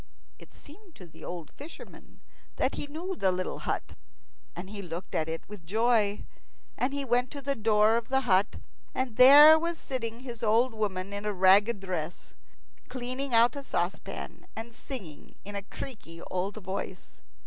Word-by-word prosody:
It - - -15
seemed 350 +4 -16
to 180 - -12
the 160 -2 -15
old 170 -4 -7
fisherman 295 +4 -12 0.3
that - - 0
he - - -4
knew 340 +6 -5
the 190 - +2
little 185 0 -3
hut, - - -3 0.6
and 180 +2 -7
he 205 +1 -7
looked 175 0 -7
at 160 0 0
it 165 0 -5
with 205 -4 -10
joy. 215 +2 +1 0.5
And 255 - 0
he 280 0 -2
went 245 0 +1
to 285 - -5
the 280 +1 +1
door 220 -1 +3
of 235 +1 -4
the 265 0 +2
hut, 200 -4 +2 0.4
and 255 -4 -2
there 295 +5 +10
was 335 +1 -2
sitting 235 -4 -4
his 240 -3 -7
old 230 +3 +3
woman 200 -3 -3
in 200 0 -4
a 210 0 -1
ragged 195 +3 +4
dress, 175 -3 -5 0.6
cleaning 255 +1 -2
out 235 +3 +5
a 280 - -4
saucepan, 180 -8 -4
and 225 +1 -7
singing 190 - -8
in 205 +1 -7
a 200 - -2
creaky 195 -6 -9
old 185 +2 -2
voice. 190 -2 -6
220 Hz, 170 wpm, -29 LUFS, 190-260 Hz, 0.6 s, there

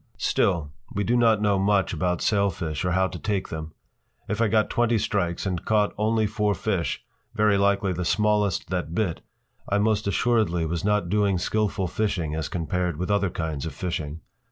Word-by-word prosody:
Still, 85 -7 +1 0.2
we 100 - -1
do 120 +5 +1
not 115 -3 +4
know 100 -2 +3
much 100 -1 +2
about 90 +2 -1
sailfish 90 -7 0
or 90 -1 0
how 95 +1 +3
to 90 -2 -7
take 100 -3 -2
them. 80 0 -5 0.6
If 105 +1 -2
I 115 - +4
got 110 0 +2
twenty 120 -1 +2
strikes 95 -5 -1
and 90 -3 -2
caught 105 -1 +2
only 110 +1 +1
four 105 0 0
fish, 90 -10 -2 0.3
very 105 -1 +3
likely 100 -1 +2
the 90 +1 -3
smallest 105 -1 +1
that 85 -3 -2
bit, 95 -6 -1 0.5
I 100 - +2
most 105 0 +1
assuredly 100 -5 +1
was 80 +1 -2
not 105 -3 +1
doing 100 -1 +2
skilful 100 +1 0
fishing 90 -5 -1
as 80 -1 -3
compared 90 -1 -2
with 90 +4 -2
other 100 -2 +2
kinds 80 -3 -3
of - - -7
fishing. 80 -3 -4
100 Hz, 180 wpm, -25 LUFS, 85-105 Hz, 0.6 s, not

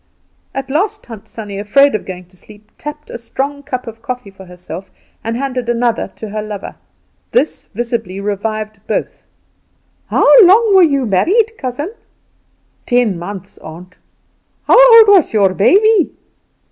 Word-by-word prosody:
At 270 0 -5
last 410 +8 -1
Tant 225 -4 -11
Sannie, 205 -3 -8
afraid 275 +7 +3
of 215 - -4
going 185 -1 -8
to 185 - -23
sleep, 210 +3 -17
tapped 300 0 -8
a - - -7
strong 275 +5 -4
cup 255 -3 -5
of 225 -1 -10
coffee 250 -4 -6
for 190 0 -14
herself 180 +1 -10 0.3
and 230 +1 -3
handed 255 -2 -3
another 235 -1 0
to 220 - -8
her 215 +1 -4
lover. 210 -2 -7 0.6
This 300 - 0
visibly 230 -5 -3
revived 215 +1 -4
both. - - -4 0.8
"How - - +1 0.2
long 405 +3 +5
were 380 - +7
you 280 -6 +2
married, 375 - +2
cousin?" 280 - -5 1.0
"Ten 240 -7 +1
months, 195 +2 -9
aunt." 175 +3 -12 0.7
"How - - +7
old 435 - +4
was 390 - +4
your 200 -3 +3
baby?" 400 - +3
235 Hz, 145 wpm, -15 LUFS, 200-285 Hz, 1.0 s, were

